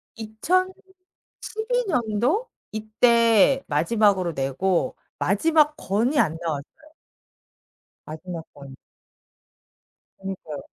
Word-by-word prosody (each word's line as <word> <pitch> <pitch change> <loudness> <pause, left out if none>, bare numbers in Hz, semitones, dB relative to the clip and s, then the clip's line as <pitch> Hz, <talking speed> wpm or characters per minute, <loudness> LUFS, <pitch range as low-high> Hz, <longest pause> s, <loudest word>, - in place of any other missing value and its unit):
2012 370 - -3
년도? 250 - 0 0.2
이때 230 +3 +3
마지막으로 185 +3 +2
내고 150 +7 0 0.2
마지막 300 - +3
권이 230 +9 0
안 165 -7 +2
나왔어요. 150 -4 -3 1.4
마지막 165 +1 -7
권. 140 -2 -12 1.4
그니까요. 190 -6 -6
215 Hz, 160 characters per minute, -24 LUFS, -, 1.4 s, 이때